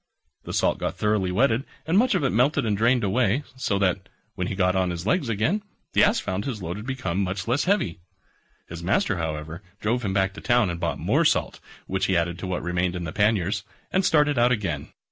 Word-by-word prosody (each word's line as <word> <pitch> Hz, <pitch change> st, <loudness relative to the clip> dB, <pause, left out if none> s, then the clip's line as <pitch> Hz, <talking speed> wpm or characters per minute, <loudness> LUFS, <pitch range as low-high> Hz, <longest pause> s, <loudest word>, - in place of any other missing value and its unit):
The -, -, -6 dB
salt -, -, +1 dB
got -, -, -2 dB
thoroughly 105 Hz, -3 st, +1 dB
wetted 115 Hz, +5 st, +2 dB, 0.2 s
and 160 Hz, -, 0 dB
much 240 Hz, +2 st, +4 dB
of 180 Hz, -, +1 dB
it 135 Hz, -, +2 dB
melted 125 Hz, +4 st, +2 dB
and 105 Hz, -2 st, +1 dB
drained 120 Hz, +3 st, +2 dB
away, 120 Hz, +5 st, +1 dB
so 115 Hz, -6 st, -1 dB
that, 95 Hz, -1 st, 0 dB, 0.2 s
when 90 Hz, -, -3 dB
he 95 Hz, -, -3 dB
got 90 Hz, -1 st, +2 dB
on 95 Hz, -1 st, +1 dB
his 85 Hz, 0 st, -4 dB
legs 140 Hz, -, +1 dB
again, 115 Hz, -, +1 dB, 0.3 s
the -, -, +5 dB
Ass -, -, +4 dB
found 95 Hz, +2 st, -3 dB
his 125 Hz, -6 st, -3 dB
load 90 Hz, 0 st, -4 dB
had 105 Hz, +3 st, -8 dB
become 100 Hz, -9 st, -2 dB
much 95 Hz, +1 st, -3 dB
less 125 Hz, +5 st, +1 dB
heavy. 175 Hz, -, +1 dB, 0.7 s
His 85 Hz, 0 st, -8 dB
master, 95 Hz, +2 st, +1 dB
however, 80 Hz, +1 st, -4 dB, 0.2 s
drove 120 Hz, +3 st, 0 dB
him 100 Hz, -, -1 dB
back 95 Hz, 0 st, +1 dB
to 105 Hz, -, -10 dB
town 120 Hz, -6 st, +2 dB
and 85 Hz, -, -5 dB
bought 85 Hz, -5 st, -1 dB
more -, -, +2 dB
salt, -, -, +1 dB, 0.3 s
which 95 Hz, +1 st, -1 dB
he 95 Hz, -, +2 dB
added 85 Hz, +1 st, -1 dB
to 95 Hz, -, -5 dB
what 90 Hz, -3 st, -2 dB
remained 90 Hz, +1 st, 0 dB
in 90 Hz, -, -4 dB
the 85 Hz, -, -5 dB
panniers, 100 Hz, -2 st, +1 dB, 0.3 s
and 190 Hz, -, +2 dB
started 150 Hz, -6 st, +3 dB
out 120 Hz, +1 st, +4 dB
again. 90 Hz, -, -1 dB
100 Hz, 225 wpm, -25 LUFS, 90-120 Hz, 0.7 s, the